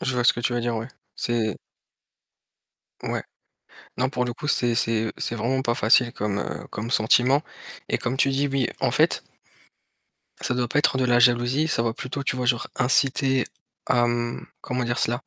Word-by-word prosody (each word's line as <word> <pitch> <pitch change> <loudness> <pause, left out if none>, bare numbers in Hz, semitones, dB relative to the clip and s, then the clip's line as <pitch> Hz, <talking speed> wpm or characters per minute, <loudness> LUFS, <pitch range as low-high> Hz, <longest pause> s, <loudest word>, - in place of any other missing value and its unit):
Je 130 - -1
vois 120 -1 0
ce - - +7
que - - -5
tu 120 - 0
veux 120 - 0
dire, 120 -1 -1
ouais, 115 +2 -5 0.3
c'est 115 -4 -1 1.5
Ouais. - - -2 0.7
Non, 130 +1 +1
pour 125 -3 -1
le 120 - -3
coup, 150 - -6
c'est 120 -5 +2
c'est 115 -1 0
c'est 115 - -3
vraiment 130 +4 0
pas 120 -1 0
facile 120 +2 +4
comme, 105 -3 -2
heu, - - -5
comme 115 +3 -5
sentiment 125 +5 +3 0.5
et - - +1
comme 125 +3 -3
tu 135 0 +3
dis, 140 +1 0
oui, 135 -2 0
en - - +2
fait - - +2 1.2
ça 130 - -1
doit 125 -1 -1
pas 145 - 0
être 135 - +2
de 130 - +1
la 120 -1 +4
jalousie, 120 +4 +3
ça 115 - +1
va 115 -1 0
plutôt 130 +3 -5
tu 130 - -1
vois, 125 -1 -2
genre 120 -1 +1
inciter 130 +1 +3 0.4
à, 120 -1 +3
mmh, 120 0 -2
comment 125 -1 -2
dire 120 +1 -1
cela? 120 +1 +1
120 Hz, 195 wpm, -24 LUFS, 120-130 Hz, 1.5 s, ce